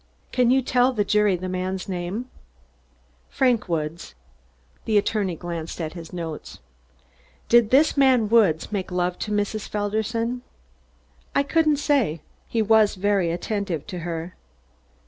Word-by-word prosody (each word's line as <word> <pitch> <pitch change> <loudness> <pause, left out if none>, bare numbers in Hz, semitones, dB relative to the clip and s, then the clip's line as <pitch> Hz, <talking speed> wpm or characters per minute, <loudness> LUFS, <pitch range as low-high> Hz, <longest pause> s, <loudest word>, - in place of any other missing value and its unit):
"Can 250 -2 +3
you 265 +1 +3
tell 250 +1 +3
the 210 -4 0
jury 210 -1 +3
that 180 +1 -5
man's 185 +1 -3
name?" 185 +5 -3 1.0
"Frank 250 -7 +1
Woods." 155 - -3 0.7
The 215 -2 +2
attorney 200 -3 0
glanced 170 -1 -6
at 155 -2 -4
his 165 -2 -9
notes. 165 -3 -6 0.9
"Did 235 -2 +5
this 280 +5 +4
man 260 -5 +4
Woods 205 -9 +3
make 195 -3 -3
love 180 0 -1
to 210 - -4
Mrs. 210 +1 -2
Felderson?" 220 +4 -2 0.9
"I 280 - +4
couldn't 310 0 +2
say. 265 - +1 0.2
He 225 -1 0
was 215 -1 +4
very 195 -2 +1
attentive 180 -2 -3
to 185 -4 -6
her." 170 +1 -5
205 Hz, 135 wpm, -24 LUFS, 175-230 Hz, 1.0 s, Did